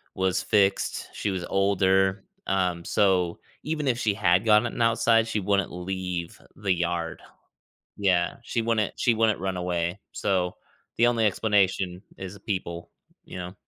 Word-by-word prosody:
was 95 Hz, -1 st, +1 dB
fixed. 100 Hz, -2 st, +1 dB
She 105 Hz, -, -2 dB
was 95 Hz, -2 st, -3 dB
older, 95 Hz, 0 st, +2 dB, 0.2 s
um, 90 Hz, -3 st, 0 dB
so, 90 Hz, -4 st, +2 dB, 0.2 s
even 150 Hz, -2 st, -2 dB
if 125 Hz, -1 st, +1 dB
she 110 Hz, -4 st, +1 dB
had 95 Hz, 0 st, +2 dB
gotten 110 Hz, +2 st, +3 dB
outside, 115 Hz, 0 st, +3 dB
she 110 Hz, -2 st, -1 dB
wouldn't 100 Hz, -1 st, 0 dB
leave 90 Hz, -1 st, -4 dB, 0.2 s
the 100 Hz, -3 st, 0 dB
yard. 85 Hz, -1 st, -2 dB, 0.8 s
Yeah, 90 Hz, -3 st, +1 dB
she 115 Hz, -1 st, -2 dB
wouldn't 110 Hz, -2 st, 0 dB
she 120 Hz, -, +3 dB
wouldn't 110 Hz, -3 st, +2 dB
run 95 Hz, -1 st, -2 dB
away, 90 Hz, +1 st, -2 dB
so, 90 Hz, -2 st, -1 dB, 0.4 s
the 120 Hz, -, +4 dB
only 115 Hz, -2 st, +2 dB
explanation 95 Hz, -3 st, +1 dB, 0.2 s
is 95 Hz, +1 st, -8 dB
people, 90 Hz, -4 st, -4 dB, 0.3 s
you -, -, -10 dB
know. 90 Hz, +1 st, -6 dB
95 Hz, 145 wpm, -26 LUFS, 90-105 Hz, 0.8 s, the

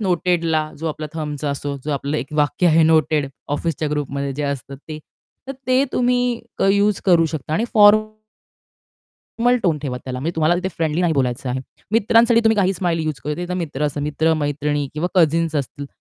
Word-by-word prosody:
नोटेडला 170 Hz, -5 st, 0 dB
जो 165 Hz, -, -4 dB
आपला 155 Hz, 0 st, -5 dB
थंबचा 150 Hz, -2 st, -3 dB
असो 140 Hz, 0 st, -4 dB
जो 150 Hz, -, -3 dB
आपलं 140 Hz, +2 st, -2 dB
एक 140 Hz, +1 st, -5 dB
वाक्य 150 Hz, +4 st, +1 dB
आहे 165 Hz, -1 st, +5 dB
नोटेड 155 Hz, -2 st, +3 dB, 0.3 s
ऑफिसच्या 155 Hz, -1 st, -2 dB
ग्रुपमध्ये 140 Hz, -1 st, -3 dB
जे 150 Hz, -, -3 dB
असतं 140 Hz, -1 st, -4 dB
ते 155 Hz, -, -6 dB, 0.5 s
तर 270 Hz, -, -2 dB
ते 255 Hz, +2 st, +3 dB
तुम्ही 245 Hz, -1 st, +1 dB, 0.2 s
क -, -, 0 dB
युज 205 Hz, 0 st, +2 dB
करू 170 Hz, -4 st, +4 dB
शकता 155 Hz, -1 st, -5 dB
आणि 220 Hz, -, +1 dB
फॉर्मल 215 Hz, +1 st, +3 dB, 1.2 s
टोन 160 Hz, -5 st, +1 dB
ठेवा 135 Hz, -3 st, -4 dB
त्याला 125 Hz, -1 st, -5 dB
म्हणजे 165 Hz, +5 st, -3 dB
तुम्हाला 160 Hz, +2 st, +3 dB
तिथे 185 Hz, +1 st, -2 dB
फ्रेंडली 160 Hz, 0 st, 0 dB
नाही 175 Hz, -2 st, +2 dB
बोलायचं 130 Hz, -1 st, -1 dB
आहे. 130 Hz, +1 st, -2 dB, 0.3 s
मित्रांसाठी 230 Hz, +1 st, +4 dB
तुम्ही 220 Hz, -1 st, +4 dB
काही 190 Hz, -1 st, +2 dB
स्माईल 175 Hz, -3 st, -1 dB
युज 155 Hz, -3 st, -3 dB
करू 150 Hz, +4 st, -3 dB
ते 180 Hz, -, -2 dB
मित्र 160 Hz, -6 st, -4 dB
असतात 145 Hz, 0 st, -2 dB
मित्र-मैत्रिणी 150 Hz, -1 st, 0 dB
किंवा 165 Hz, +4 st, -1 dB
कझिन्स 165 Hz, -2 st, +2 dB
असतील. 140 Hz, +1 st, -4 dB
155 Hz, 180 wpm, -20 LUFS, 145-180 Hz, 1.2 s, आहे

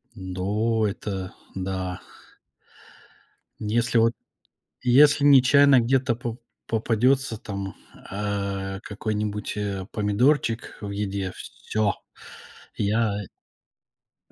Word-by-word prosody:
Ну, 105 Hz, +4 st, -1 dB
это 95 Hz, -2 st, -4 dB, 0.2 s
да. 95 Hz, -1 st, -3 dB, 1.6 s
Если 115 Hz, +3 st, +1 dB
вот, 115 Hz, +1 st, +4 dB, 0.7 s
если 140 Hz, +4 st, +5 dB
нечаянно 140 Hz, 0 st, +7 dB
где-то 130 Hz, +1 st, +2 dB
по 120 Hz, -1 st, -5 dB, 0.3 s
попадётся 115 Hz, +3 st, +1 dB
там, 100 Hz, -3 st, -6 dB, 0.3 s
э, 100 Hz, -1 st, -3 dB
какой-нибудь, 105 Hz, -1 st, -3 dB
э, 100 Hz, -2 st, -3 dB
помидорчик 115 Hz, +3 st, +1 dB
в 100 Hz, -1 st, -5 dB
еде, 100 Hz, -2 st, -2 dB, 0.3 s
всё. 105 Hz, -2 st, +1 dB, 0.8 s
Я 105 Hz, +1 st, +1 dB, 1.2 s
Э, -, -, -27 dB
105 Hz, 85 wpm, -25 LUFS, 100-120 Hz, 1.6 s, нечаянно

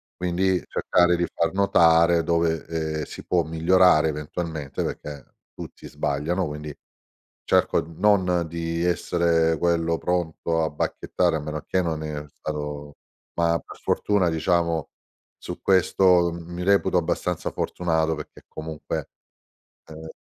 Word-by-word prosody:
Quindi 90 Hz, +1 st, +1 dB
cercare 90 Hz, -1 st, +2 dB
di 85 Hz, -, +1 dB
far 85 Hz, -1 st, 0 dB
notare 85 Hz, -4 st, +4 dB
dove, 85 Hz, -1 st, 0 dB
ehm, 80 Hz, -1 st, -2 dB
si -, -, -9 dB
può 90 Hz, -2 st, +2 dB
migliorare 80 Hz, 0 st, +4 dB
eventualmente, 75 Hz, -1 st, -4 dB
perché 75 Hz, -3 st, -6 dB, 0.3 s
tutti -, -, -10 dB
sbagliano, 75 Hz, +6 st, -1 dB
quindi 75 Hz, 0 st, -7 dB, 0.7 s
cerco -, -, +2 dB
n 80 Hz, +2 st, -11 dB
non 90 Hz, -5 st, +3 dB
di 85 Hz, 0 st, -3 dB
essere 85 Hz, -2 st, +2 dB
quello 85 Hz, -1 st, +1 dB
pronto 85 Hz, -2 st, -1 dB
a 80 Hz, -, -1 dB
bacchettare, 75 Hz, -, -1 dB
a -, -, -2 dB
meno 75 Hz, 0 st, -5 dB
che 95 Hz, -, +1 dB
non 80 Hz, -3 st, -2 dB
è 75 Hz, -1 st, -5 dB
stato 75 Hz, -1 st, -6 dB, 0.4 s
ma 85 Hz, 0 st, +2 dB
per -, -, -12 dB
fortuna 100 Hz, -4 st, +1 dB
diciamo 85 Hz, -1 st, 0 dB, 0.5 s
su -, -, -7 dB
questo 90 Hz, -2 st, +4 dB
m 85 Hz, 0 st, -9 dB
mi 90 Hz, +1 st, -4 dB
reputo 95 Hz, -1 st, +3 dB
abbastanza 80 Hz, -, -2 dB
fortunato 80 Hz, -2 st, 0 dB
perché 75 Hz, -, -10 dB
comunque 80 Hz, 0 st, -5 dB, 0.8 s
ehm, 80 Hz, 0 st, -10 dB
85 Hz, 130 wpm, -24 LUFS, 80-90 Hz, 0.8 s, notare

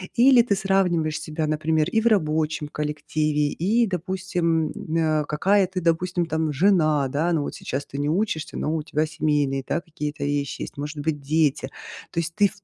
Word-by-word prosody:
Или 250 Hz, 0 st, +7 dB
ты 220 Hz, -4 st, +1 dB
сравниваешь 180 Hz, -5 st, +1 dB
себя, 155 Hz, 0 st, -3 dB
например, 155 Hz, 0 st, +1 dB
и 225 Hz, -, +2 dB
в 230 Hz, -, +2 dB
рабочем 155 Hz, -7 st, +1 dB
коллективе? 150 Hz, 0 st, -1 dB
И, 220 Hz, +10 st, +1 dB
допустим, 180 Hz, -4 st, -1 dB, 0.3 s
э, 155 Hz, -2 st, +1 dB
какая 190 Hz, +7 st, +2 dB
ты, 185 Hz, 0 st, -4 dB
допустим, 175 Hz, +1 st, 0 dB
там 160 Hz, -1 st, -1 dB
жена, 155 Hz, -3 st, +3 dB
да. 155 Hz, +6 st, 0 dB
Но 155 Hz, -3 st, +1 dB
вот -, -, -5 dB
сейчас 135 Hz, +2 st, -4 dB
ты 140 Hz, -, -7 dB
не 145 Hz, +1 st, 0 dB
учишься, 170 Hz, -3 st, -1 dB
но 155 Hz, -, -1 dB
у 155 Hz, -, -1 dB
тебя 155 Hz, 0 st, -1 dB
семейные, 150 Hz, -3 st, 0 dB
да, -, -, 0 dB
какие-то 150 Hz, -3 st, -5 dB
вещи 145 Hz, -1 st, -2 dB
есть, -, -, -9 dB
может 145 Hz, +1 st, -5 dB
быть, 145 Hz, -1 st, -2 dB
дети. 145 Hz, -2 st, +1 dB, 0.4 s
То -, -, -1 dB
есть 170 Hz, 0 st, -3 dB
ты, 205 Hz, -1 st, +5 dB
в 200 Hz, 0 st, -15 dB
160 Hz, 185 wpm, -24 LUFS, 150-180 Hz, 0.4 s, Или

